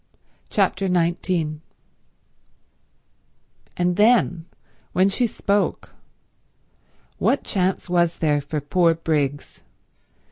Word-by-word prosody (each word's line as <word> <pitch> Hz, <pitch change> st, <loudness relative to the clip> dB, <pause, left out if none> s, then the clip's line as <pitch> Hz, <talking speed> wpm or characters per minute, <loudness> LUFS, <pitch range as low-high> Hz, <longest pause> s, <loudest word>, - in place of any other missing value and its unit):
Chapter 195 Hz, -1 st, 0 dB
19 170 Hz, -3 st, 0 dB, 2.2 s
And 180 Hz, 0 st, +1 dB
then 210 Hz, -6 st, +3 dB, 0.5 s
when 185 Hz, +2 st, +3 dB
she 240 Hz, +5 st, +1 dB
spoke... 200 Hz, -2 st, -1 dB, 1.3 s
what 280 Hz, -, +1 dB
chance 190 Hz, -2 st, -1 dB
was 175 Hz, -1 st, +1 dB
there 150 Hz, -2 st, +1 dB
for 150 Hz, +1 st, -4 dB
poor 165 Hz, +3 st, +2 dB
Briggs? 145 Hz, -4 st, -2 dB
175 Hz, 80 wpm, -22 LUFS, 155-190 Hz, 2.2 s, then